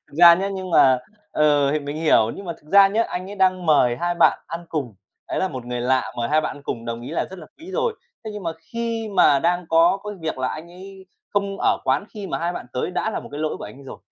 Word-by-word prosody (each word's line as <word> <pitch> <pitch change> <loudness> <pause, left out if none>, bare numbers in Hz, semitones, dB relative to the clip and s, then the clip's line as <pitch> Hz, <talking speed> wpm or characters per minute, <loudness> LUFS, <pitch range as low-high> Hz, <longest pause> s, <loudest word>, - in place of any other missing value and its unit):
Thực - - -19
ra 170 -1 +10
nhá, 195 +3 -2
nhưng 190 -2 -5
mà, 130 -5 +5 0.3
ờ, 145 -2 +3
thì 155 - +1
mình 145 +1 -5
hiểu, 150 -8 +3
nhưng 200 - -8
mà 170 - -3
thực 150 - -20
ra 200 0 +8
nhá, 220 +3 +1
anh 185 +2 -5
ấy 205 - -8
đang 185 -2 +2
mời 125 -6 +4
hai 175 +4 -1
bạn - - +4
ăn 170 +1 -6
cùng, 135 -9 -3 0.3
đấy - - -2
là 190 - +1
một 130 -5 -7
người 125 0 -3
lạ 130 +1 +1
mời 115 0 -1
hai 155 +1 +3
bạn 155 - -4
ăn 145 - -13
cùng, 115 -4 -5
đồng 115 0 -4
ý 125 - -7
là 165 - -1
rất 190 - -9
là 155 - -11
quý 335 +5 -11
rồi. 460 +2 0 0.3
Thế 215 - -5
nhưng 210 -1 -7
mà 165 -1 -2 0.2
khi 230 -1 -2
mà 140 - +5
đang 175 +1 0
có 165 +4 +4
cái 210 0 -5
việc 160 -4 -3
là 130 0 0
anh 160 +2 -7
ấy 190 +1 -12 0.2
không 200 -1 -1
ở - - +2
quán - - +1
khi 205 -2 -6
mà - - -3
hai 170 +1 -1
bạn 130 - -7
tới, 125 - -2
đã 220 +4 -1
là - - -3
một - - -11
cái 145 - -5
lỗi 155 0 -1
của - - -8
anh 105 +5 -10
ấy 140 - -14
rồi. - - -9
170 Hz, 290 wpm, -22 LUFS, 140-195 Hz, 0.3 s, ra